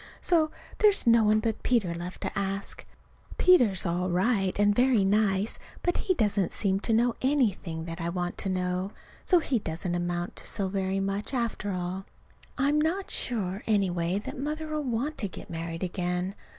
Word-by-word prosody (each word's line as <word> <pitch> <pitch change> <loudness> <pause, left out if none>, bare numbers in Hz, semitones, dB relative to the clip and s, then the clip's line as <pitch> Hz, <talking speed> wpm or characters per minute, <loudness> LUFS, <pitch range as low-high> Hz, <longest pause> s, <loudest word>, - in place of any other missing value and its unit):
So 325 -3 +3 0.3
there's 415 -2 +5
no 230 -1 +5
one 215 +1 +4
but 220 -1 -2
Peter 215 -9 +1
left 175 +2 -7
to - - -4
ask. 195 0 -3 0.5
Peter's 240 - +4
all 180 +1 0
right 190 +1 +1
and 205 0 +4
very 245 -3 +3
nice, 200 0 +1 0.2
but 350 - +1
he 370 - 0
doesn't 205 - +1
seem 195 -2 +1
to 225 - -2
know 235 +1 +3
anything 210 - 0
that 165 0 -6
I 170 - -1
want 175 0 -2
to 195 - -1
know. 185 +1 -1 0.3
So 360 - +5
he 275 -7 +1
doesn't 175 0 -3
amount 175 0 -2
to - - -8
so 195 -3 0
very 190 0 -1
much, 195 +6 -2
after 235 -4 -1
all. 185 0 -3 0.5
I'm 285 +3 +2
not 360 +5 -1
sure, 200 -5 0
anyway, 185 -4 +1
that 205 - -6
Mother'll 305 +2 -3
want 265 +3 -2
to 205 - 0
get 180 - -10
married 165 +1 -4
again. 180 +1 -2
200 Hz, 175 wpm, -28 LUFS, 180-240 Hz, 0.5 s, there's